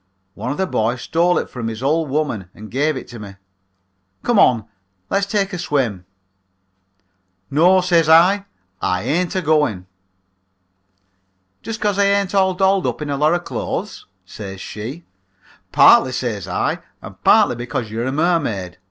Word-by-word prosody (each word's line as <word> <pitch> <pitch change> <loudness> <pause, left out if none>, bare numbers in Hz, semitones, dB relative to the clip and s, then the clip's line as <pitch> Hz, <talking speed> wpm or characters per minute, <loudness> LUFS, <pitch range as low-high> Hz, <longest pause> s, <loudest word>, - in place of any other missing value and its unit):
One 125 - -5
of 145 - -3
the 190 - +1
boys 120 -7 -1
stole 175 +2 +2
it - - -1
from 115 -3 -6
his 115 +2 -5
old 155 +2 +1
woman 130 - -2
and 110 0 -11
gave 145 +3 0
it - - -8
to 120 - -9
me. 100 -2 -10 0.9
Come 240 -4 +2
on, 115 -4 +4 0.5
let's 200 0 +1
take 200 -1 -1
a 180 - -4
swim.' 120 - -1 1.5
"'No,' 180 +6 +4
says 170 -3 +2
I, 185 +5 +5 0.4
'I 90 +1 0
ain't 170 - -1
agoing.' 150 - +1 1.8
"'Just 225 0 -6
'cause 205 -2 0
I 200 - +4
ain't 200 -1 +1
all 190 -2 +2
dolled 190 0 +2
up - - -3
in 145 - -4
a - - 0
lot 150 +4 +2
of 175 - -3
clothes?' - - -5 0.2
says 95 -2 -8
she. 120 - -7 0.7
"'Partly,' 130 -1 +6
says 115 -7 -3
I, - - -1 0.2
'and - - -13
partly - - +5
because 120 -2 -4
you 115 +1 -3
are - - -2
a 130 - -1
mermaid. 140 - -1
150 Hz, 160 wpm, -19 LUFS, 115-180 Hz, 1.8 s, Partly